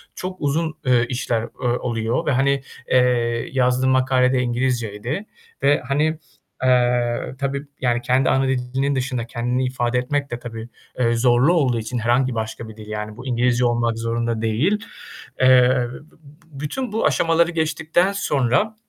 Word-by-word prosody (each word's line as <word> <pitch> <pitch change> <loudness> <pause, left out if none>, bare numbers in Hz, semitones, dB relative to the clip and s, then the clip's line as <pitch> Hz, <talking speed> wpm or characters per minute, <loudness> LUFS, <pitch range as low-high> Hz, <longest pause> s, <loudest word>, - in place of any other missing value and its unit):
çok 185 0 -5
uzun, 155 +2 -1
eee, 125 -2 +3
işler 120 -2 -1
o 120 +2 -5
oluyor 115 -1 -1
ve, - - +1
hani, 140 +1 +2 0.3
eee, 120 -2 +2
yazdığım 130 0 +2
makale 130 0 +3
de 130 - +2
İngilizceydi 120 - -2 0.4
ve, 145 +1 +4
hani, 150 +3 +1 0.4
eee, 125 -1 +1
tabii, 140 0 -2 0.2
yani, 120 -1 +1
kendi 130 +2 +2
ana 135 0 +2
dilinin 130 +2 -1
dışında 125 -2 -2
kendini 125 +2 -1
ifade 125 -1 -1
etmek 140 +2 -2
de 120 - -4
tabii, 115 -1 -8 0.3
eee, 120 -1 +2
zorlu 125 +6 +3
olduğu 130 -9 +2
için 115 +3 -4
herhangi 120 +2 +1
başka 110 0 -4
bir 110 - -12
dil 105 - -11
yani 105 0 -5
bu 130 - -10
İngilizce 125 0 +1
olmak 120 -1 +1
zorunda 115 0 -2
değil. 125 - +1 0.6
Eee, 125 -1 +5
b - - -9 0.2
b 155 0 -17
bütün 220 - -4
bu 220 - 0
aşamaları 170 +1 +2
geçtikten 160 +3 +1
sonra 195 - 0
125 Hz, 155 wpm, -21 LUFS, 120-140 Hz, 0.6 s, Eee